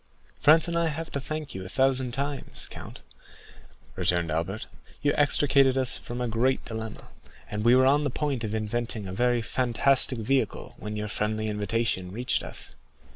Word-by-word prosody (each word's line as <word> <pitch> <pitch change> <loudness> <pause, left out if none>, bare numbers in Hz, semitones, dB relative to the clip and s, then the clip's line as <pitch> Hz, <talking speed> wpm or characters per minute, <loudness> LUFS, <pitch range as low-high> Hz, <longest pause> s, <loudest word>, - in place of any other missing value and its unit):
"Franz 160 +3 +5
and 170 - -2
I 170 0 +2
have 160 +1 -4
to 140 - -3
thank 155 0 -5
you 95 - -6
a 95 - -8
thousand 130 +1 +2
times, 140 +2 -2
count," - - -10 0.9
returned 85 -2 +1
Albert; 85 +7 -2 0.4
"you 145 - +3
extricated 140 -2 +3
us 130 -1 +1
from 120 +1 -7
a 125 - 0
great 120 +4 +1
dilemma, 110 -1 -7 0.4
and 105 0 -2
we 120 +2 +6
were 130 0 +5
on 145 +3 +4
the 145 - 0
point 135 -2 -2
of 110 0 -2
inventing 110 -1 -2
a 95 - -5
very 120 +2 +1
fantastic 130 +2 +3
vehicle 130 +4 -1
when 105 0 -5
your 105 0 -3
friendly 110 +1 -2
invitation 105 -3 -1
reached 120 +5 -1
us." - - -6
120 Hz, 175 wpm, -27 LUFS, 105-135 Hz, 0.9 s, we